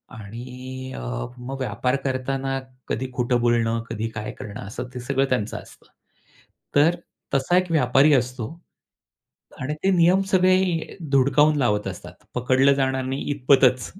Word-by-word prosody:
आणि 125 +4 -8
अ, - - -6 0.4
मग 130 +2 -6
व्यापार 125 +1 -1
करताना 135 0 -1 0.3
कधी 130 - -2
खोटं 125 0 +1
बोलणं, 115 -1 +2
कधी 110 +2 -3
काय 110 -1 -5
करणं 105 -1 -8
असं 115 +4 -5
ते 125 - -5
सगळं 135 +2 0
त्यांचं 115 -3 -1
असतं. - - -14 0.9
तर 155 +4 +5 0.4
तसा 140 +6 +2
एक 185 -1 +1
व्यापारी 140 0 +4
असतो. 125 -3 0 1.2
आणि 145 +3 -2
ते 195 - +3
नियम 180 +1 +4
सगळे 185 -3 +2
धुडकावून 140 +3 +4
लावत 105 -7 +1
असतात. - - -8 0.2
पकडलं 130 +3 +4
जाणार 130 -1 0
नाही 135 +2 -3
इतपतच 130 -2 +3
130 Hz, 135 wpm, -23 LUFS, 120-140 Hz, 1.2 s, तर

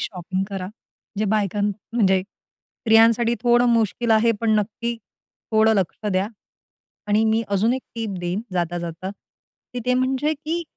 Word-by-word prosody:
Shopping 185 0 -3
करा, 195 -2 -4
म्हणजे 210 +1 -8
बायकां 205 -1 0 0.3
म्हणजे 190 -5 +3
स्त्रियांसाठी 225 +3 +1
थोडं 240 0 +4
मुश्किल 230 0 +1
आहे 225 +1 +4
पण 230 -1 +1
नक्की 235 +3 -3 0.6
थोडं 220 0 +4
लक्ष 195 +2 -2
द्या. 185 +1 +1 0.8
आणि 210 +2 +2
मी 220 +1 +2
अजून 205 +4 +2
एक 260 - -4
टिप 225 -2 -3
देईन 175 +3 -2
जाता-जाता, 175 0 -3
की 225 +4 -14
ते 250 - +3
म्हणजे 265 +4 +1
की 315 +4 -3
220 Hz, 140 wpm, -22 LUFS, 195-235 Hz, 0.8 s, थोडं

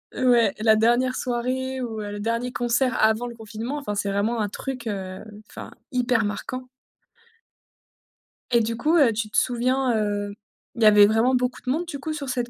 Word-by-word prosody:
Ouais, 240 -5 +3
la 220 0 +4
dernière 240 +4 +2
soirée 255 +2 -2
ou 225 -3 -4
le 205 0 -5
dernier 230 +3 -2
concert 245 +1 0
avant 220 +2 +2
le 240 - -8
confinement, 225 +5 -6
enfin 265 -8 -4
c'est 200 0 -2
vraiment 205 +4 0
un 210 -2 -1
truc, 250 +1 -6
heu, 190 -2 -5 0.3
enfin - - -9 0.2
hyper 250 -3 +1
marquant. 255 +5 -5 1.8
Et 235 -1 +4
du 230 +1 -2
coup, 310 +7 +2
heu, 265 -8 +5
tu 215 0 -3
te - - -3
souviens, 250 +1 +1
heu, 205 -1 -1 0.4
il 230 - -6
y - - +5
avait 210 -1 +8
vraiment 225 +5 +3
beaucoup 250 0 -1
de - - -6
monde 325 +6 -1
du 290 -5 -6
coup 310 +2 -4
sur 285 -3 -5
cette 245 -1 -2
235 Hz, 185 wpm, -24 LUFS, 215-255 Hz, 1.8 s, avait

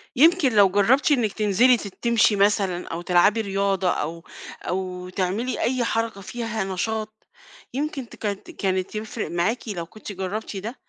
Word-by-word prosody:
يمكن 320 0 +5
لو 200 -2 +7
جربتِ 225 +10 +3
إنِك 235 -8 +2
تنزلي 220 +4 +4
تت 200 -3 -8
تمشي 235 -3 +4
مثلًا 195 -3 +1
أو 165 - -4
تلعبي 180 +5 +3
رياضة 195 -2 0
أو 165 0 -3 0.4
أو 180 0 -3
تعملي 195 +7 -2
أي 255 0 +1
حركة 225 -3 -1
فيها 225 +1 -3
نشاط، 215 +3 -4 0.5
يمكن 275 -2 -3
تك - - -14 0.4
كانت 190 0 -1
يفرق 215 -1 -4
معاكِ 200 +9 -1
لو 175 -5 -4
كنتِ 215 +4 -10
جربتِ 195 +2 -4
ده، 220 +6 -5
205 Hz, 150 wpm, -24 LUFS, 185-230 Hz, 0.5 s, لو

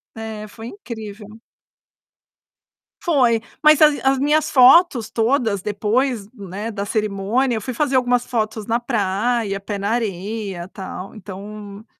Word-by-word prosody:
É, 220 -1 -6
foi 225 +2 -10
incrível. 220 - -9 1.6
Foi, 250 -9 +3 0.2
mas 305 -1 +6
as 300 -2 +6
as 270 0 +3
minhas 300 +2 +2
fotos 260 -2 +6
todas 225 -4 +1
depois, 215 +3 -1
né, 205 0 -6
da 200 -1 -4
cerimônia, 215 +4 0
eu 220 - -3
fui 255 +4 -4
fazer 275 +2 0
algumas 245 -1 +2
fotos 220 -3 -2
na 230 +2 0
praia, 210 -1 -1
pé 200 +1 -5
na 200 +1 -2
areia, 205 -4 -3
tal, 190 -1 -8
então, 205 +1 -9
220 Hz, 130 wpm, -21 LUFS, 205-250 Hz, 1.6 s, mas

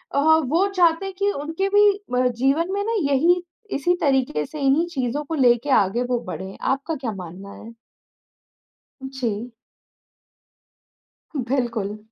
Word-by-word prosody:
अ, - - +3
वो 315 +4 +3
चाहते 345 0 +3
हैं 390 - -5
कि 400 +1 +1
उनके 320 +5 -3
भी 410 +1 +6 0.2
म 250 0 +3
जीवन 280 +8 +1
में 405 0 -1
ना 455 - -1 0.2
यही 340 +6 +3 0.3
इसी 350 +6 +1
तरीके 265 - +1
से, 305 - -9
इन्हीं 275 +5 +3
चीज़ों 275 -3 -2
को 320 - -3
लेके 245 -1 +3
आगे 200 +6 -1
वो 245 -1 +1
बढ़ें। 190 +1 -6
आपका 275 +4 -1
क्या 260 -5 -4
मानना 190 +1 -9
है? 230 +1 -11 1.4
जी। 240 -3 -4 2.0
बिल्कुल। 230 -6 -1
275 Hz, 140 wpm, -22 LUFS, 240-330 Hz, 2.0 s, भी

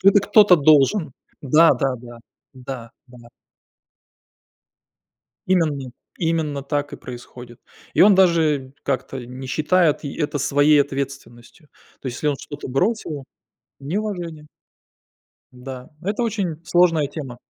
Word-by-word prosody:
Это 200 +1 +6
кто-то 200 -2 +6
должен. 155 +2 +3 0.3
Да-да-да, 130 -5 +2 0.4
да, 125 -3 -8 0.2
да. 120 -2 -16 2.2
Именно 155 -8 0 0.3
именно 160 -4 -1
так 145 +1 -3
и - - -6
происходит. 120 -1 -11 0.3
И - - +2
он 200 +1 +8
даже 160 -8 +2
как-то 130 -1 -3
не 125 +2 -9
считает 155 +4 +2
и 140 - -5
это 150 -1 -2
своей 145 +2 +4
ответственностью. 135 0 -6 0.3
То - - -9
есть, 125 -1 -4
если 150 - -1
он 145 - 0
что-то 145 -1 -8
бросил 155 - -1 0.6
неуважение. 170 -1 -4 1.1
Да, 125 0 -9
это 205 +6 -2
очень 200 -8 -2
сложная 165 -4 +3
тема. 135 -4 -8
145 Hz, 115 wpm, -21 LUFS, 130-170 Hz, 2.2 s, он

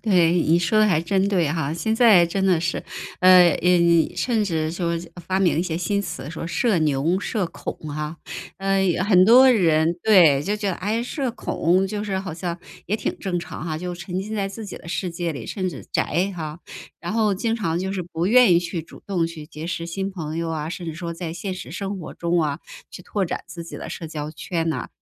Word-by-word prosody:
对， 180 -6 +4
你 170 -1 +3
说 175 +5 +2
的 215 - +5
还 175 -6 +2
真 190 +3 +1
对 180 -6 +2
哈。 155 -2 -1
现 220 +7 -1
在 210 -8 +6
真 190 +3 -1
的 180 -4 +3
是， 175 +1 -2 0.4
呃 185 -1 +8
嗯， 170 -2 +4
甚 230 -4 0
至 160 -5 -1
说 170 0 -2 0.4
发 190 0 +1
明 175 -4 +2
一 - - +2
些 170 -2 -3
新 200 +4 0
词 175 -6 -6
说 165 0 -5
社 175 +4 +1
牛， 155 +4 +1
社 205 -2 -2
恐 - - -6 0.2
哈。 150 +2 -5 0.4
呃， 195 0 +1 0.3
很 185 -3 +6
多 255 +5 +8
人 165 -7 +3
对， 170 -10 +6
就 200 +6 -1
觉 210 -2 -2
得， 185 - 0
哎， 215 +6 -1
社 260 +1 -2
恐 185 -5 +1
就 210 +1 -4
是 195 -2 -2
好 190 -4 -5
像 170 0 -4 0.3
也 205 - -1
挺 - - -3
正 180 -2 -2
常 160 -1 -7
哈， 155 -2 -3
就 180 +1 -4
沉 175 +1 -4
浸 215 +3 -5
在 200 -2 -1
自 210 +2 -7
己 195 - -8
的 - - -12
世 180 +1 -2
界 170 0 -3
里， 125 -7 -7
甚 190 -3 -3
至 140 - -10
宅 180 +5 0
哈。 155 0 -6 0.4
然 175 - -5
后 215 -2 +2
经 225 +4 -1
常 170 -7 -1
就 190 +1 -2
是 190 -2 -2
不 170 0 -3
愿 240 -1 +6
意 170 - +6
去 170 -1 -4
主 - - -15
动 180 -4 0
去 165 -2 -9
结 155 +1 -8
识 170 -1 -3
新 195 +3 -3
朋 160 -5 -5
友 165 0 -2
啊， 155 -1 -3
甚 175 +1 -6
至 160 - -4
说 170 0 -5
在 165 -1 -5
现 185 +2 -4
实 185 - -8
生 195 0 -4
活 175 - -8
中 170 0 0
啊， 150 -1 -1 0.3
去 - - -9
拓 200 +2 -1
展 170 - -4
自 170 -1 -8
己 170 - -8
的 - - -7
社 165 - -6
交 150 -1 -5
圈 165 +1 -3
呐， 160 - -3
175 Hz, 245 characters per minute, -23 LUFS, 165-195 Hz, 0.4 s, 呃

